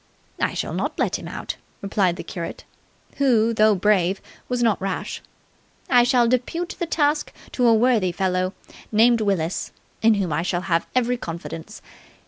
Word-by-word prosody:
"I -, -, 0 dB
shall -, -, -3 dB
not -, -, -2 dB
let -, -, 0 dB
him -, -, -8 dB
out," -, -, -5 dB, 0.3 s
replied 195 Hz, -3 st, +1 dB
the -, -, -7 dB
curate, 170 Hz, -3 st, -6 dB, 0.5 s
who, 230 Hz, -5 st, +3 dB
though 215 Hz, -1 st, +4 dB
brave, 190 Hz, -1 st, +2 dB, 0.3 s
was 250 Hz, -1 st, 0 dB
not 220 Hz, -5 st, +2 dB
rash. 195 Hz, -1 st, -3 dB, 0.7 s
"I 245 Hz, -1 st, +7 dB
shall 245 Hz, -1 st, +3 dB
depute 255 Hz, +9 st, -1 dB
the 345 Hz, -, -1 dB
task 295 Hz, -1 st, +1 dB, 0.2 s
to 250 Hz, -2 st, +2 dB
a 230 Hz, -, +6 dB
worthy 220 Hz, -5 st, +3 dB
fellow 185 Hz, +1 st, -1 dB, 0.4 s
named 230 Hz, +2 st, +4 dB
Willis, 190 Hz, -5 st, -1 dB, 0.3 s
in 225 Hz, -1 st, +5 dB
whom 185 Hz, -6 st, -1 dB
I 155 Hz, -, 0 dB
shall 175 Hz, 0 st, -1 dB
have 170 Hz, -2 st, 0 dB
every 250 Hz, 0 st, +2 dB
confidence. 165 Hz, -4 st, -7 dB
215 Hz, 160 wpm, -23 LUFS, 185-245 Hz, 0.7 s, I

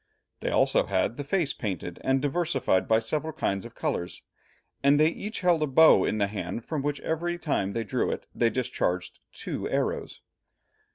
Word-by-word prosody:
They -, -, -2 dB
also -, -, +3 dB
had -, -, 0 dB
the 145 Hz, -, -4 dB
face 155 Hz, 0 st, 0 dB
painted 95 Hz, -4 st, -5 dB
and 135 Hz, +1 st, +1 dB
diversified 145 Hz, -, +1 dB
by 110 Hz, -, +4 dB
several 155 Hz, +8 st, -2 dB
kinds 100 Hz, -, -1 dB
of -, -, -11 dB
colours, 85 Hz, 0 st, -3 dB, 0.6 s
and 140 Hz, +1 st, +4 dB
they 155 Hz, +1 st, +5 dB
each 210 Hz, +6 st, -5 dB
held 175 Hz, -3 st, +3 dB
a 155 Hz, -, +2 dB
bow 160 Hz, +4 st, +6 dB
in -, -, 0 dB
the 105 Hz, -, +2 dB
hand, 100 Hz, +2 st, -5 dB
from 155 Hz, -3 st, -2 dB
which 145 Hz, 0 st, -2 dB
every 175 Hz, +2 st, -2 dB
time 120 Hz, -, -1 dB
they 115 Hz, -, -1 dB
drew 105 Hz, -, -1 dB
it, -, -, -4 dB
they 115 Hz, -, +2 dB
discharged 115 Hz, -8 st, -2 dB
two -, -, -4 dB
arrows. -, -, -2 dB
135 Hz, 180 wpm, -27 LUFS, 110-160 Hz, 0.6 s, bow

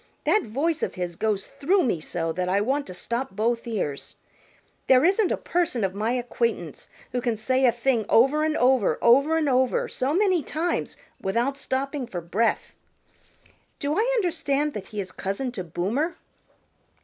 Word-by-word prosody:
That 425 Hz, -, +3 dB
voice 300 Hz, +7 st, -1 dB
of -, -, -2 dB
his 175 Hz, -2 st, -4 dB
goes 205 Hz, +1 st, -1 dB
through 365 Hz, +6 st, +1 dB
me 225 Hz, -, 0 dB
so 165 Hz, +1 st, -3 dB
that 180 Hz, +2 st, -2 dB
I 195 Hz, +2 st, +2 dB
want 270 Hz, +7 st, 0 dB
to 185 Hz, -, -7 dB
stop 235 Hz, +5 st, -3 dB
both 230 Hz, +3 st, 0 dB
ears. 170 Hz, -11 st, -3 dB, 0.7 s
There 260 Hz, +3 st, +6 dB
isn't 390 Hz, +2 st, +3 dB
a -, -, +1 dB
person 335 Hz, -10 st, -1 dB
of 190 Hz, -1 st, 0 dB
my 215 Hz, +4 st, -1 dB
acquaintance 235 Hz, -, -2 dB, 0.2 s
who 250 Hz, -, -1 dB
can 235 Hz, -2 st, -1 dB
say 260 Hz, +4 st, +1 dB
a -, -, +5 dB
thing 235 Hz, -2 st, 0 dB
over 270 Hz, +6 st, +4 dB
and 310 Hz, 0 st, 0 dB
over, 250 Hz, -3 st, +3 dB
over 275 Hz, +7 st, +4 dB
and 315 Hz, -2 st, +1 dB
over, 260 Hz, -1 st, +2 dB
so 260 Hz, +2 st, -2 dB
many 375 Hz, -3 st, +3 dB
times 320 Hz, +5 st, -2 dB, 0.2 s
without 235 Hz, +8 st, 0 dB
stopping 275 Hz, 0 st, -2 dB
for 180 Hz, -, -5 dB
breath. 195 Hz, +7 st, -1 dB, 1.0 s
Do 285 Hz, +1 st, -1 dB
I 460 Hz, +4 st, +2 dB
understand 315 Hz, -, 0 dB
that 210 Hz, -, -6 dB
he 210 Hz, -, -6 dB
is 190 Hz, -2 st, -4 dB
cousin 200 Hz, +7 st, -3 dB
to 195 Hz, -6 st, -5 dB
Boomer?" 215 Hz, -, -2 dB
250 Hz, 175 wpm, -25 LUFS, 210-295 Hz, 1.0 s, There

